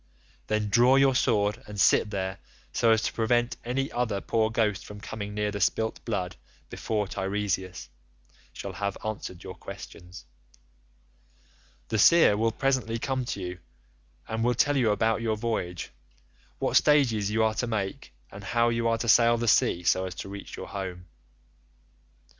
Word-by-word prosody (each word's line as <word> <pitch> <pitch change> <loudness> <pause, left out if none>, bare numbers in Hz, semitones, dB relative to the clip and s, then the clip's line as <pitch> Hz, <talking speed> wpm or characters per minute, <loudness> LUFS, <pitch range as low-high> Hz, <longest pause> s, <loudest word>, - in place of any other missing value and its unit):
Then 110 -1 0
draw 120 +5 +5
your 135 0 +5
sword 105 -4 +1
and 105 -1 -7
sit 105 - +4
there, 95 -1 -3 0.3
so 115 - +2
as 110 0 +4
to - - -1
prevent 120 +2 +1
any 135 +3 -2
other 120 -5 -1
poor 110 +2 0
ghost 110 -3 0
from 105 0 -10
coming 105 0 -6
near 105 0 -1
the 100 - -4
spilt 110 +4 0
blood 95 -6 -3 0.3
before 105 -2 -2
Teiresias 95 -3 -3 0.6
shall - - -7
have 100 -1 -3
answered 100 -4 -5
your - - -7
questions. 90 +2 -11 1.6
The 110 - 0
seer 165 - +6
will 115 +2 +1
presently 130 -2 0
come 130 +1 -2
to 110 - -4
you, 90 0 -5 0.7
and 110 0 -2
will 120 +1 +2
tell 145 +4 +2
you 125 -5 +3
about 110 +2 +1
your 110 -2 0
voyage—what 65 - -5
stages 120 -9 +3
you 110 +1 +1
are 110 -1 +2
to 120 - -2
make, 100 -4 -3 0.2
and 100 +1 -10
how 115 +5 +2
you 115 0 0
are 115 0 +2
to 120 - -4
sail 115 +1 +5
the 120 0 -2
sea 110 -6 +3
so 95 +2 +2
as 90 - -7
to - - -7
reach 100 0 -8
your - - -7
home. 95 -3 -6
110 Hz, 165 wpm, -27 LUFS, 100-115 Hz, 1.6 s, seer